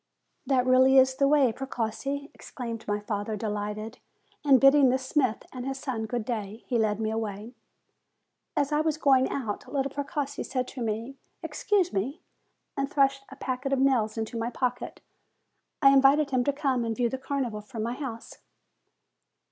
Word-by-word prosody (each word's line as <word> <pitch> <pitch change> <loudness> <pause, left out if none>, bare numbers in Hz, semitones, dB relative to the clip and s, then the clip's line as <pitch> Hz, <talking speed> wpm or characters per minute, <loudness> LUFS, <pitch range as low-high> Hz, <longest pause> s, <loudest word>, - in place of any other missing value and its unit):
"That 260 -2 +2
really 260 +1 +5
is 260 0 +6
the 275 +1 +2
way, 275 -5 +4
Precossi!" 270 +3 -4
exclaimed 230 -3 -7
my 205 0 0
father 210 0 -3
delighted. 210 +2 -4 0.4
And 275 -3 +6
bidding 275 0 +6
the 255 - +3
smith 260 -3 0
and 250 -1 -5
his 270 +1 -3
son 245 -5 -3
good 240 -1 -3
day, 220 -2 -4
he 240 - 0
led 215 -1 +1
me 220 -1 -1
away. 220 +1 -4 1.0
As 285 0 +1
I 300 0 +2
was 310 -1 0
going 265 -4 +4
out, 225 -7 -4
little 275 -1 -1
Precossi 285 0 -3
said 255 -1 -2
to 260 - -8
me, 230 +4 -3 0.3
"Excuse 390 -4 0
me," 255 - -2 0.6
and 275 0 -1
thrust 275 -1 +2
a 270 - -10
packet 265 0 -3
of - - +2
nails 240 -5 +2
into 225 +1 -3
my 230 +1 -1
pocket. 250 0 -3 0.8
I 275 - +8
invited 275 +2 +5
him 255 -2 +2
to 285 - +3
come 270 -3 0
and 225 -1 -2
view 245 0 +1
the 260 +3 -4
Carnival 260 -5 -3
from 215 +1 -6
my 235 +2 -2
house. 250 -4 -7
255 Hz, 170 wpm, -27 LUFS, 225-275 Hz, 1.0 s, I